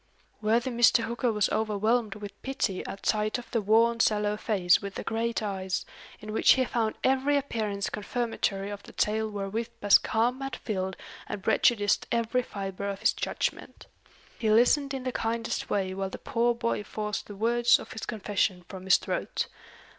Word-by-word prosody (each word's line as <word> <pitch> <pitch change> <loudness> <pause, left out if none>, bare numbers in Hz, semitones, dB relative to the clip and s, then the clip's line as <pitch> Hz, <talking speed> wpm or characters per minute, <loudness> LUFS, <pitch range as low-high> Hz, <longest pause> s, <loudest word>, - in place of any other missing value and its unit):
Worthy 230 +4 +1
Mr. 235 0 +4
Hooker 235 +2 -1
was 210 -2 +2
overwhelmed 220 0 0
with 205 -1 -9
pity 245 -8 -2
at 195 - -8
sight 215 +1 +1
of 245 - -10
the 230 - +1
worn 230 +3 +3
sallow 210 -1 +2
face 195 -5 +2
with 200 -1 -6
the - - -4
great 230 0 -1
eyes, 190 -2 -2 0.3
in 215 0 -7
which - - +6
he 260 -1 +1
found 225 -3 -1
every 270 +2 +3
appearance 215 -7 -2
confirmatory 210 -3 -2
of 205 -1 -6
the - - -14
tale 220 +1 0
wherewith 210 +3 -3
Bascombe 225 +5 +3
had 270 - -4
filled 190 -3 -3 0.3
and 195 - -5
prejudiced 205 -4 +3
every 235 +2 +1
fibre 200 -3 -5
of 200 -1 -5
his - - +3
judgment. - - -3 0.5
He 220 - 0
listened 270 +5 +4
in 265 - -5
the 255 - -2
kindest 230 0 -2
way 190 -2 0
while 195 0 -3
the - - -7
poor 235 +1 0
boy 230 -2 -1
forced 210 0 -4
the 205 - -8
words 235 +3 +4
of - - -10
his 220 - -6
confession 200 -4 -1
from 190 -1 -9
his 190 - +6
throat. - - -2
220 Hz, 175 wpm, -28 LUFS, 200-235 Hz, 0.5 s, which